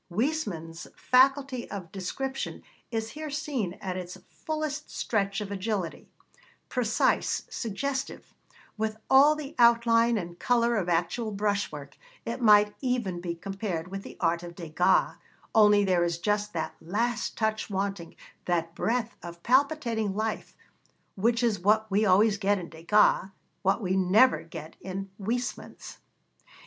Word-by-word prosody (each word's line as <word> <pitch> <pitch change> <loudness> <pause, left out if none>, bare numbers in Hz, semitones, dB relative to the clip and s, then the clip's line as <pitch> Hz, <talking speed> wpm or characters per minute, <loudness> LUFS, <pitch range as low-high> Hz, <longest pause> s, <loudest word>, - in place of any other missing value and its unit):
Huysmans' 185 - -2
faculty 265 0 +2
of 185 -5 -7
description 265 +8 -4 0.3
is 225 -1 -3
here 310 0 -6
seen 275 - -2
at 185 -1 -5
its 180 0 -7
fullest 305 -2 -4
stretch 200 -2 -1
of 205 -1 -5
agility; 200 -3 -3 0.6
precise, 235 -4 +1
suggestive, 265 +5 -4 0.5
with 220 0 -1
all 280 +3 +7
the 300 -2 -7
outline 235 0 +5
and 175 -3 -6
colour 235 -1 +2
of 185 -5 -1
actual 175 +7 0
brush 205 0 -1
work, 140 -2 -10 0.3
it 235 +2 -4
might 210 -2 +6
even 235 -9 -1
be 170 -1 -3
compared 190 -2 -4
with 195 +1 -5
the - - -11
art 170 -1 +1
of 175 -1 -9
Degas, 170 +1 +1 0.4
only 210 -2 +6
there 180 -2 +2
is 170 -1 -1
just 210 +3 -1
that 160 -2 -3
last 225 +8 -2
touch 220 -1 -1
wanting, 195 -3 -3 0.3
that 170 -2 -1
breath 230 +5 -1
of 170 0 -10
palpitating 245 -6 +1
life, 215 +1 -3 0.6
which 230 +4 +1
is 220 -5 +1
what 215 +3 +2
we 210 +2 +3
always 205 +2 +4
get 205 0 +2
in 175 -3 -7
Degas, 185 +4 +3 0.3
what 195 +4 +1
we 185 0 0
never 190 -1 +4
get 165 -1 -10
in 195 +1 -6
Huysmans. 245 +5 -4
210 Hz, 140 wpm, -28 LUFS, 180-235 Hz, 0.6 s, all